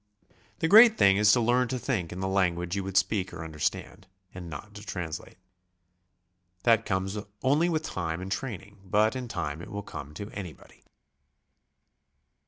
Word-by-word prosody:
The 160 - 0
great 220 +4 +8
thing 100 0 +5
is 105 0 +5
to 125 - +4
learn 120 +2 +2
to 130 - -2
think 115 -10 -2
in 90 - -6
the 95 - -1
language 90 -2 0
you 100 - -2
would 95 0 -2
speak 100 -3 +1
or 85 -2 -7
understand, 80 +4 -4 0.3
and 90 -2 -8
not 90 +7 -9
to 105 0 -10
translate. 85 -6 -6 1.3
That 115 -1 +3
comes 95 +1 -1 0.2
only 150 +6 +3
with 160 -2 -1
time 85 - -3
and 95 +1 -7
training, 100 -3 -5
but 105 +5 +2
in 130 -1 -4
time 85 -7 -4
it - - -9
will 105 0 -5
come 75 -5 -9
to 105 +5 -7
anybody. 90 -6 -10
100 Hz, 170 wpm, -28 LUFS, 90-115 Hz, 1.3 s, great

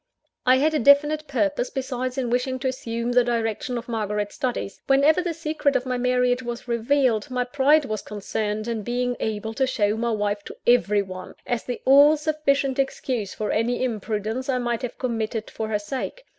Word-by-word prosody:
I 255 - +7
had 300 +4 +2
a 305 - +2
definite 295 +4 +4
purpose, 245 -2 0
besides, 255 -1 -3
in 250 -3 -1
wishing 250 +1 0
to 270 - 0
assume 235 -2 -3
the 245 0 +5
direction 235 +1 -1
of 235 - -6
Margaret's 210 -3 -2
studies. 245 -6 -3
Whenever 280 +5 +4
the 350 -1 -2
secret 310 -3 -1
of 250 - +1
my 250 -1 -2
marriage 250 0 +2
was 240 0 -6
revealed, 235 -1 +1
my 250 -1 0
pride 285 +4 +3
was 215 -5 -3
concerned 210 +1 -3
in 230 -2 -2
being 245 +3 -1
able 220 0 -3
to 265 +3 +1
show 210 -5 +1
my 235 +1 0
wife 205 -2 -1
to - - -9
every 210 -4 +4
one, 185 -1 -9
as 240 -1 -2
the 245 - -5
all 285 +3 +7
sufficient 285 -3 0
excuse 255 -6 -2
for 215 - -2
any 240 +3 0
imprudence 220 +2 -2
I 260 - +2
might 240 -1 -1
have 250 -2 -5
committed 225 -3 -3
for 220 - -4
her 215 -1 0
sake. 260 - -5
245 Hz, 190 wpm, -24 LUFS, 220-265 Hz, -, I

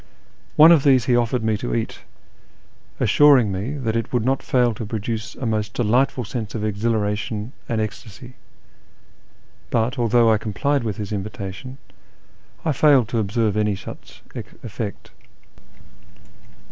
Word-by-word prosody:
One 160 +2 +8
of 160 -5 +5
these 130 -5 +4
he 125 - +3
offered 120 0 +1
me 110 -1 +1
to - - -3
eat, - - -3 1.0
assuring 140 -8 +5
me 100 +9 -3
that 115 -5 -2
it 115 - -2
would 120 -3 0
not 135 +1 +1
fail 125 -2 +2
to 110 - -6
produce 110 0 -4
a 130 - -5
most 110 -1 -2
delightful 125 +3 +1
sense 110 0 -5
of 105 -1 -2
exhilaration 105 +1 -2 0.2
and 115 - 0
ecstasy; 110 +4 -6 1.4
but, 120 +4 0
although 115 -1 +4
I 110 - +3
complied 135 +6 -1
with 110 -4 -3
his 105 -1 -5
invitation, 105 +4 -6 0.9
I 160 - +2
failed 140 -4 +4
to 120 - 0
observe 105 0 0
any 105 -1 +1
such 95 - -11
effect. - - -7
115 Hz, 140 wpm, -22 LUFS, 105-125 Hz, 1.4 s, One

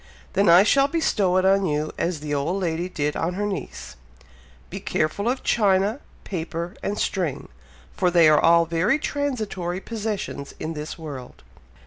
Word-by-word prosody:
"Then 200 -2 +3
I 175 +3 +8
shall 275 +6 +4
bestow 210 - +1
it 185 - +2
on 195 +1 +4
you, 150 0 -1
as 170 -3 -2
the 150 -1 -4
old 150 +7 -1
lady 175 0 -2
did 150 -4 -2
on 175 +2 -2
her 205 +2 -1
niece 65 - -6 0.7
'Be - - -5
careful 180 +9 -1
of 255 +1 -2
china, 205 +2 +2 0.2
paper 170 -1 -5
and 205 +1 -2
string, 175 -8 -2 0.5
for 180 - +2
they 170 -2 +5
are 155 -1 +5
all 170 0 +5
very 170 - +1
transitory 215 - -3
possessions 210 -9 -5
in 160 - -4
this 150 0 -6
world!'" 140 -6 -9
180 Hz, 160 wpm, -24 LUFS, 160-205 Hz, 0.7 s, I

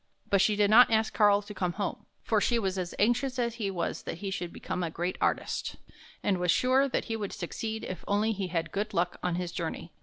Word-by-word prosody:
But 200 -1 +5
she 210 +1 +3
did 205 0 +3
not 245 +3 +8
ask 220 -1 +2
Karl 205 -1 +4
to 210 +1 -9
come 180 -3 -1
home, 200 +1 -4 0.2
for 215 -2 +2
she 240 - +2
was 190 -4 -1
as 175 -1 -4
anxious 245 +4 +1
as 235 -2 0
he 200 - 0
was 180 -3 -3
that - - -5
he 195 +2 -4
should 175 -2 -4
become 180 - -4
a 170 - -1
great 175 +3 -2
artist, - - -1 0.5
and 190 -3 +1
was 180 0 0
sure 260 +8 +4
that - - -1
he 225 - -3
would 205 -3 -4
succeed 220 +5 -4
if 185 - -5
he - - -18
only 210 +2 +2 0.2
had 165 -2 -2
good 205 +2 -3
luck 175 +1 0
on 180 -1 0
his 175 -1 -3
journey. 165 0 -4
200 Hz, 240 wpm, -29 LUFS, 180-220 Hz, 0.5 s, not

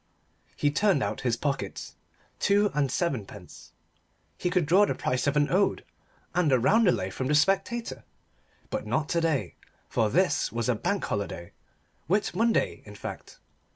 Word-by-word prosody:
He 145 - +1
turned 195 - +2
out 105 +1 -3
his 120 -2 0
pockets. 140 0 -3 0.5
Two 205 +1 +3
and 145 -2 0
seven 140 - -1
pence. 95 -2 -13 0.6
He 180 - -2
could 180 -3 +1
draw 185 +7 +5
the - - -1
price 125 +2 -1
of 140 +1 +2
an 145 -1 +2
ode 195 +3 +1 0.5
and 175 -5 +2
a 130 - +5
roundelay 175 - +3
from 130 +7 -3
the 150 - +2
Spectator 195 +8 0 0.7
but - - -3
not 155 -1 0
to 170 - +1
day, 160 -5 -1 0.3
for 110 - +1
this 170 - +1
was 115 0 -2
a 125 - +3
Bank 180 - -1
Holiday, 95 -4 -4 0.6
Whit 200 +6 +1
Monday, 225 +4 +1
in - - -12
fact. - - -8
150 Hz, 160 wpm, -27 LUFS, 125-190 Hz, 0.7 s, draw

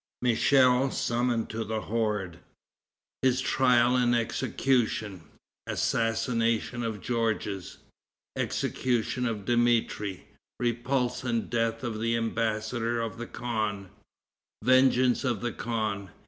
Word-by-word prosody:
Michel 125 +2 +4
Summoned 120 -2 0
to 110 +1 -3
the 110 0 -3
Horde. 105 -6 -2 0.8
His 130 -1 +3
Trial 125 -2 +3
and 120 -1 +3
Execution. 115 -4 0 0.5
Assassination 115 +1 0
of 110 -4 -3
Georges. 110 -5 -2 0.6
Execution 125 0 -1
of 105 -4 -4
Dmitri. 120 -5 +1 0.3
Repulse 125 +1 -1
and 115 -3 -2
Death 115 0 0
of 115 -3 -3
the 115 0 +1
Embassador 115 +1 -1
of 115 0 -4
the 120 - -5
Khan. 110 -5 -3 0.7
Vengeance 130 0 +4
of 120 -6 -1
the 120 - -1
Khan. 110 -5 -3
115 Hz, 105 wpm, -28 LUFS, 110-125 Hz, 0.8 s, Michel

